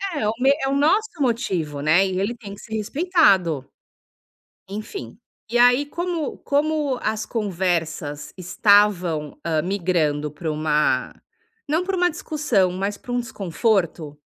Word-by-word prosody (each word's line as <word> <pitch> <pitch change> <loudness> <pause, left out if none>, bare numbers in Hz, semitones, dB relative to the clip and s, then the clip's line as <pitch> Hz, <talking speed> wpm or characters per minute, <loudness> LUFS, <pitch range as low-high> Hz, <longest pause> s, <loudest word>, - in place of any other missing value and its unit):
É 215 -7 0
o 215 - +1
me 270 +2 +5
é - - +1
o 275 - 0
nosso 385 +10 +3
motivo, 180 - -1
né, 165 +6 +4
e 185 -1 -2
ele 220 +5 -1
tem 205 -4 -10
que - - -15
ser 220 -1 -6
respeitado. 210 - +2 1.0
Enfim, 200 - -7 0.3
e 240 - +1
aí 245 +4 +5
como 340 0 -3
como 290 -2 0
as 220 0 -1
conversas 170 - -2
estavam, 180 -5 +2
ah, 160 -2 0
migrando 165 -6 0
para 160 +1 -4
uma 150 0 +1 0.5
não 320 +5 +1
para 385 0 -2
uma 355 0 +3
discussão, 245 - 0
mas 200 +2 -3
para 245 - -9
um 245 - +1
desconforto 185 -7 -1
200 Hz, 145 wpm, -22 LUFS, 165-265 Hz, 1.0 s, me